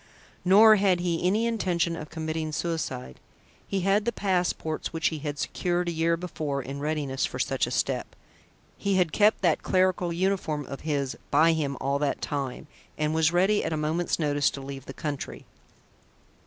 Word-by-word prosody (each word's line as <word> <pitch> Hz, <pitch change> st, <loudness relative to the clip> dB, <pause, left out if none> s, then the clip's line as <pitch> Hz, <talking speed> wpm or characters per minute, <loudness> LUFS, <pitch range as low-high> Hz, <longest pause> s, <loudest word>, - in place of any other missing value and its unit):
Nor 215 Hz, +4 st, +7 dB
had 190 Hz, -3 st, +3 dB
he 175 Hz, -2 st, -1 dB
any 215 Hz, +5 st, +2 dB
intention 180 Hz, -7 st, 0 dB
of 155 Hz, -2 st, -7 dB
committing 160 Hz, -1 st, -3 dB
suicide. 150 Hz, -, -3 dB, 0.5 s
He 195 Hz, -1 st, -1 dB
had 195 Hz, +3 st, +2 dB
the 235 Hz, -, +1 dB
passports 180 Hz, -6 st, -1 dB
which 165 Hz, -1 st, +1 dB
he 160 Hz, -, -5 dB
had 145 Hz, 0 st, -4 dB
secured 175 Hz, +3 st, -1 dB
a -, -, 0 dB
year 165 Hz, 0 st, +1 dB
before 155 Hz, -5 st, -3 dB
in 135 Hz, +1 st, -6 dB
readiness 145 Hz, -3 st, -2 dB
for -, -, -2 dB
such -, -, 0 dB
a -, -, -4 dB
step -, -, -1 dB, 0.6 s
(he 200 Hz, -1 st, +1 dB
had 180 Hz, -4 st, +2 dB
kept 210 Hz, +2 st, +3 dB
that 170 Hz, -4 st, +3 dB
clerical 185 Hz, -2 st, +1 dB
uniform 170 Hz, -5 st, -1 dB
of 135 Hz, -, -7 dB
his 140 Hz, -4 st, -1 dB
by 165 Hz, +1 st, +5 dB
him 145 Hz, -4 st, -2 dB
all 140 Hz, +1 st, 0 dB
that 145 Hz, -1 st, 0 dB
time) 140 Hz, -1 st, -4 dB, 0.3 s
and 150 Hz, 0 st, 0 dB
was 160 Hz, 0 st, +3 dB
ready 190 Hz, +4 st, +3 dB
at 160 Hz, -, -2 dB
a -, -, -1 dB
moment's 155 Hz, +3 st, 0 dB
notice 145 Hz, -3 st, +2 dB
to -, -, -7 dB
leave 135 Hz, -1 st, -8 dB
the -, -, -6 dB
country. 145 Hz, -3 st, -5 dB
160 Hz, 180 wpm, -27 LUFS, 150-180 Hz, 0.6 s, Nor